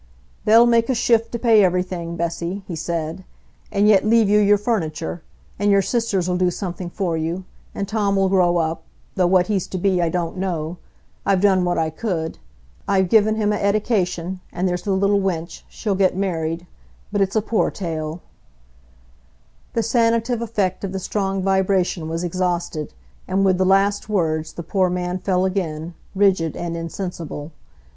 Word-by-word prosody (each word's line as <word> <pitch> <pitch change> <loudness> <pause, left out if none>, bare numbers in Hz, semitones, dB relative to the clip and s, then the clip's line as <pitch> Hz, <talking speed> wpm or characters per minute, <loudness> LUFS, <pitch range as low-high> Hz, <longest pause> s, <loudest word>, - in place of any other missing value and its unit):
"They'll 225 +2 +7
make 235 0 +3
a 260 - +2
shift 230 0 +2
to 235 - -2
pay 225 -3 +5
everything, 180 -2 -1
Bessy," 170 +3 -3
he 175 - -4
said, 165 +2 -3 0.5
"and 205 +1 +3
yet 205 -3 +5
leave 225 0 +4
you 210 +1 +5
your 205 0 +5
furniture; 160 - -2 0.4
and 205 0 +2
your 200 -1 +4
sisters'll 190 -6 0
do 180 0 +2
something 180 -1 -5
for 175 -2 -2
you—and 175 +4 -5
Tom'll 200 -2 +1
grow 180 -2 +3
up—though 165 +2 -2
what 180 0 +4
he's 195 -2 -1
to 185 - -4
be 185 -1 +1
I 170 - +1
don't 170 +1 -2
know—I've 180 +2 -3
done 190 -2 +3
what 175 - 0
I 160 -1 0
could—I've 160 - -3
given 215 0 +4
him 210 -1 +1
a - - 0
eddication—and 190 -4 -1
there's 180 -1 -1
the 200 - -1
little 200 +1 +2
wench, 170 -3 -3
she'll 210 -3 -2
get 190 -1 +2
married—but 175 +2 -4
it's 195 +1 0
a 220 - +3
poor 220 0 +1
tale——" 160 -3 -4 1.5
The 230 - +1
sanative 230 +1 +1
effect 205 -5 -1
of 195 -1 -3
the 190 - -2
strong 195 0 -2
vibration 190 -3 +1
was 165 +2 -3
exhausted, 175 -3 -2 0.4
and 195 +1 +1
with 185 -1 +3
the 185 - +3
last 200 +2 +2
words 160 -6 0
the 170 - -6
poor 185 +2 +1
man 180 0 -2
fell 185 0 +1
again, 170 -4 -3 0.2
rigid 190 -5 +2
and 170 -1 -3
insensible. 165 -2 -5
185 Hz, 160 wpm, -21 LUFS, 170-200 Hz, 1.5 s, They'll